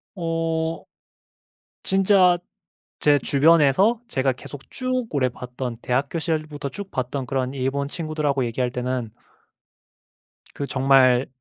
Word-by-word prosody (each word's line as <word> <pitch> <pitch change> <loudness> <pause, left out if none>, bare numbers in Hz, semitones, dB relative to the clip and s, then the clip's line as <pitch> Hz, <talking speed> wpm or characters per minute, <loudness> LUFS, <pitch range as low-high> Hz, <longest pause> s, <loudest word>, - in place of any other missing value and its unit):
어 165 -1 -2 1.0
진짜 190 -2 +4 0.6
제 145 -1 +4
주변에서 165 - +4
제가 135 - +1
계속 135 +2 -9
쭉 255 -1 -2
오래 140 -4 +1
봤던 125 0 -6
대학교 135 +6 -1
시절부터 155 -3 -3
쭉 200 +7 -8
봤던 130 +1 -3
그런 130 0 -2
일본 140 +1 -1
친구들하고 150 -5 -1
얘기할 120 +1 -2
때는 125 -3 -3 1.4
그 140 - -4
정말 130 -2 +4
140 Hz, 230 characters per minute, -23 LUFS, 130-165 Hz, 1.4 s, 진짜